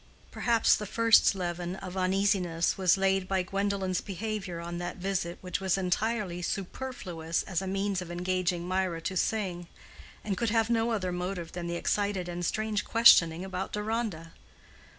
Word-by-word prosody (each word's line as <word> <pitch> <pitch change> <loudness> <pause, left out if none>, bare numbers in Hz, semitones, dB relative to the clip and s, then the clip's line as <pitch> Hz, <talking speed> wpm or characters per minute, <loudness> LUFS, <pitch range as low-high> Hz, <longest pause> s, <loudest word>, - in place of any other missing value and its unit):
Perhaps 230 -2 +3
the 210 - -5
first 230 -1 +5
leaven 175 -1 -3
of 190 -1 -8
uneasiness 185 -3 +1
was 185 -1 +3
laid 195 -1 +1
by 190 -1 +1
Gwendolen's 195 -1 -1
behavior 195 -3 -4
on 170 +1 -5
that 175 0 -4
visit 180 -2 -2
which 180 -2 -3
was 190 0 +1
entirely 190 0 -1
superfluous 180 -4 -3
as 185 -1 -2
a 190 - -4
means 195 0 -1
of 180 - -7
engaging 180 0 -1
Mirah 185 -3 -1
to 190 - -3
sing, 180 -3 -1 0.6
and 200 -2 -1
could 235 +3 0
have 225 +1 +2
no 230 0 +2
other 190 -5 -1
motive 180 -1 -4
than 175 -1 -5
the 170 - -2
excited 200 0 -1
and 175 0 -4
strange 215 +3 -1
questioning 180 -7 +6
about 190 0 -4
Deronda. 210 -6 -3
185 Hz, 160 wpm, -29 LUFS, 175-205 Hz, 0.6 s, questioning